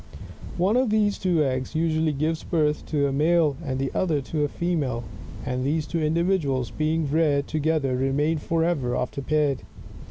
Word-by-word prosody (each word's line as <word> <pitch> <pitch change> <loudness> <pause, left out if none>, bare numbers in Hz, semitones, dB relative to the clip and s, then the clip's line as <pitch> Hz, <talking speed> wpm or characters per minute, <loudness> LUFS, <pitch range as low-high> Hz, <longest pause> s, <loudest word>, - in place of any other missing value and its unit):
One 190 +7 +2
of 255 -2 +2
these 210 -1 +2
two 175 -5 +2
eggs 130 +1 -2
usually 160 -1 +1
gives 155 +3 -1
birth 150 -3 0
to 145 -2 +1
a 140 - 0
male, 155 +1 +3
and 130 -4 -2
the 135 0 -2
other 160 -6 +1
to 150 +3 -2
a - - +2
female: 145 -8 -2 0.4
and 125 0 -2
these 150 +3 0
two 165 +1 -2
individuals 155 -5 0
being 155 0 0
reared 150 -3 +2
together 155 -4 0
remain 145 +5 +1
forever 160 -6 0
after 125 +2 -3
paired. 145 -1 +1
155 Hz, 165 wpm, -25 LUFS, 140-165 Hz, 0.4 s, male